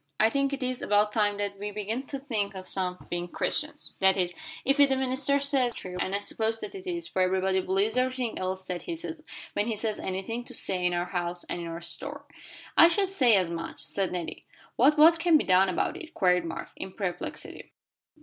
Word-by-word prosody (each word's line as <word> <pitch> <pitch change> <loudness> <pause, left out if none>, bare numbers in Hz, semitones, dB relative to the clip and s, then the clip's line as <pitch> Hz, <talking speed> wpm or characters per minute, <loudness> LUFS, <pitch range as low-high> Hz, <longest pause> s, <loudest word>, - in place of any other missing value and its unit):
"I 220 +1 +5
think 275 +1 +1
it 275 -1 -3
is 255 0 -2
about 210 0 +2
time 205 -2 +2
that 200 -1 -3
we 205 +1 -3
began 210 +4 -3
to 275 - -4
think 220 -8 -2
some 185 -2 -2
of - - -17
being 175 0 -3
Christians - - -1
that 190 0 +4
is, 180 -1 0 0.3
if 275 +2 +2
what 285 -1 +7
the 265 - +3
minister 265 +2 +2
says 275 -4 +2
is - - -10
true, 180 -1 -7
and 190 +2 -1
I - - +3
suppose 220 +2 0
that - - -6
it 380 -1 -9
is, 345 -2 -2
for 190 - -1
everybody 190 +1 +2
believes 195 +5 0
everything 255 -2 0
else 185 0 -3
that 180 -1 -4
he 340 - -4
says, 325 -1 -4 0.3
when 205 - 0
he 230 - 0
has 215 0 -2
anything 195 +6 -3
to 250 - -10
say 185 -4 0
in 180 0 +2
our 175 0 0
house 175 -1 -3
and 175 - -5
in 170 -1 -5
the 165 +1 -6
store." 280 +12 -5 0.5
"I 335 - +9
should 385 +3 +2
say 255 - +4
as 185 -3 +2
much," 165 0 -5
said 195 -2 -2
Nettie. 175 -2 -5 0.3
"But 285 +5 +4
what 325 +2 +7
can 330 -1 +5
be - - 0
done 190 +1 +4
about 185 - 0
it?" 335 -2 -10
queried 180 - +3
Mark, 165 0 -5
in 190 - -7
perplexity. 190 -5 -5
210 Hz, 225 wpm, -28 LUFS, 185-270 Hz, 0.5 s, I